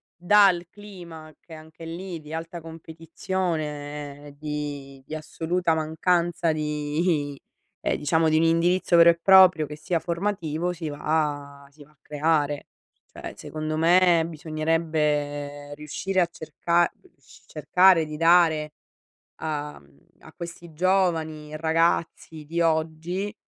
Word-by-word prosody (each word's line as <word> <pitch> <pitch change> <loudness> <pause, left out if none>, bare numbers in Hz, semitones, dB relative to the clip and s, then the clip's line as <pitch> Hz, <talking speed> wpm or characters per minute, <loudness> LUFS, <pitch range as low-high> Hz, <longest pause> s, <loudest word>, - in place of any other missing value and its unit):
dal 180 -1 +4
clima 175 -6 -11
che 165 - -15
anche 160 +1 -12
lì 175 +1 -6
di 150 +1 -11
alta 165 +1 -5
competizione, 155 -3 -5
di 145 -3 -6
di 155 - -9
assoluta 165 +2 -1
mancanza 170 +2 0
di 150 0 -1
i 140 - -15 0.4
ehm, - - 0
diciamo 160 +2 +2
di 155 - +3
un 160 - +3
indirizzo 170 +2 +2
vero 170 0 +8
e 170 - +2
proprio 185 -5 +7
che 150 - -8
sia 165 +2 -1
formativo 170 -2 -2
si 165 -3 -5
va 145 -2 -2
si 145 0 -16
va 150 - -23
a 150 - -32
creare. 150 -1 0 0.5
Cioè - - -8
secondo 155 0 -5
me 170 0 +4
bisognerebbe 150 -2 -2
riuscire 180 +6 -2
a 175 - +2
cerca 170 +2 0
rius 370 - -21
cercare 180 -3 +4
di 155 0 -7
dare 165 -2 +4 0.7
a, 150 -2 -4
mhmm 70 0 -24 0.2
a - - -15
questi 170 -1 -9
giovani 160 -4 0
ragazzi 165 -1 0
di 170 +2 -2
oggi, 165 +5 -1
160 Hz, 130 wpm, -25 LUFS, 150-170 Hz, 0.7 s, vero